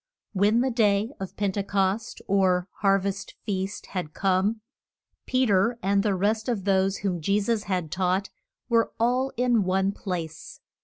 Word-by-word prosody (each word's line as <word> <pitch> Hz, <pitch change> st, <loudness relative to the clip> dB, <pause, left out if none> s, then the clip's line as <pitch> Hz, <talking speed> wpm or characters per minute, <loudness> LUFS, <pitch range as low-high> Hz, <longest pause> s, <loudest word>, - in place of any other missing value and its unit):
When 210 Hz, +4 st, +3 dB
the 260 Hz, +1 st, +1 dB
day 215 Hz, -1 st, +2 dB
of 190 Hz, -1 st, -7 dB
Pen 205 Hz, -2 st, 0 dB
te 200 Hz, -, -2 dB
cost, 200 Hz, +2 st, -1 dB
or 185 Hz, -2 st, +2 dB
har 195 Hz, -1 st, +4 dB
vest 195 Hz, 0 st, -4 dB
feast, 195 Hz, -2 st, -3 dB
had 175 Hz, -5 st, -4 dB
come, 195 Hz, +3 st, +1 dB, 0.7 s
Pe 255 Hz, 0 st, +2 dB
ter, 210 Hz, +2 st, +2 dB
and 200 Hz, +1 st, +3 dB
the 205 Hz, -2 st, +1 dB
rest 215 Hz, +4 st, 0 dB
of 220 Hz, -6 st, -1 dB
those 195 Hz, 0 st, +2 dB
whom 185 Hz, -4 st, -2 dB
Je 200 Hz, +6 st, +2 dB
sus 215 Hz, +1 st, 0 dB
had 180 Hz, -5 st, -2 dB
taught, 185 Hz, +1 st, 0 dB, 0.4 s
were 230 Hz, -2 st, +2 dB
all 250 Hz, +3 st, +1 dB
in 245 Hz, -2 st, +3 dB
one 190 Hz, +1 st, +1 dB
place. 170 Hz, -6 st, -6 dB
200 Hz, 165 wpm, -26 LUFS, 190-220 Hz, 0.7 s, har